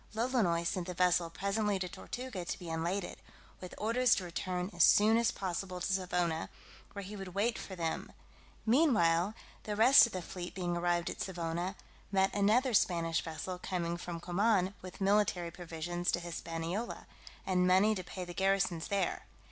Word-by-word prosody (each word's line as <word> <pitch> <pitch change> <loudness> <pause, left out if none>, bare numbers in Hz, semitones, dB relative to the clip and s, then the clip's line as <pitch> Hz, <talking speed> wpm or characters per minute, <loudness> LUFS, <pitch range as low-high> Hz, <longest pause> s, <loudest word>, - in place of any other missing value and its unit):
Lolonois 220 -8 +1
sent 175 +1 -2
the 180 - -5
vessel 180 -1 +3
presently 200 +3 0
to 185 -1 -3
Tortuga 240 +1 -6
to - - -4
be 175 -3 -7
unladed, 170 +4 -3 0.4
with 180 - -9
orders 235 +3 +3
to 190 - -3
return 180 +2 -3
as 175 -1 +4
soon 215 +2 +6
as 230 0 +3
possible 185 -1 -4
to 190 - -1
Savona, 180 -3 -1 0.4
where 200 - -6
he 200 +3 -8
would 195 -2 -8
wait 220 +4 +1
for 190 - -7
them: 165 -2 -3 0.5
meanwhile, 215 - +3 0.3
the 210 - -2
rest 240 +4 +8
of - - -10
the 185 -2 -4
fleet 175 +1 -7
being 175 -2 -2
arrived 175 0 0
at - - -7
Savona, 175 +1 -3 0.4
met 195 -1 +2
another 220 +6 +3
Spanish 170 -5 +2
vessel 165 +3 -5
coming 170 -2 -2
from 175 -1 -6
Coman, 190 +2 +1
with 185 +1 -10
military 195 -4 +2
provisions 175 +1 -3
to - - +1
Hispaniola, 170 +5 -4 0.4
and 180 -1 +2
money 190 +4 +5
to 185 -3 -4
pay 180 +1 -6
the 175 - -8
garrisons 190 -3 +1
there. 195 -3 -1
185 Hz, 170 wpm, -33 LUFS, 175-205 Hz, 0.5 s, rest